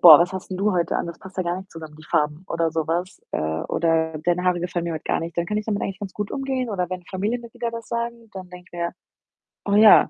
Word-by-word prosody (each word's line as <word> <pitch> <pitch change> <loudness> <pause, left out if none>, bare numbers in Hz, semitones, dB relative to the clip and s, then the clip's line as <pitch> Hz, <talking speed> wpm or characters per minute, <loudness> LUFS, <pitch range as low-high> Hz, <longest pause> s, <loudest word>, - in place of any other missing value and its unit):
„Boah, 160 -4 +12
was 175 +2 +3
hast 190 0 -5
'n 185 - -2
du 205 +1 +2
heute 175 -1 +2
an? - - -1
Das 170 - -6
passt 190 0 -12
ja 185 - +2
gar 175 +1 -1
nicht 190 0 -11
zusammen, 160 -2 -9
die 155 - -13
Farben.“ 150 +4 +1
oder 165 -1 +1
so 160 0 -1
was. 175 +4 -1
Äh, - - 0 0.3
oder: 160 -1 +2
„Deine 175 +1 +2
Haare 180 -1 +3
gefallen 175 -1 -1
mir 170 -1 -1
heut 155 - -5
gar - - +1
nicht.“ 165 +1 -5
Dann 170 - +2
kann 210 +1 0
ich 215 - -4
damit 205 -2 0
eigentlich 195 -1 -2
ganz 200 -3 -6
gut 210 -1 -3
umgehen 265 -3 -1
oder 180 -3 0
wenn 185 -1 -4
Familienmitglieder 235 +5 -2
das 230 0 -7
sagen, 235 -1 -3
dann 185 -1 -7
denke 180 0 -11
ich 175 - -7
mir: 170 0 0 0.7
„Oh, 200 - +2
ja, 215 0 +9
180 Hz, 275 wpm, -24 LUFS, 170-210 Hz, 0.7 s, Boah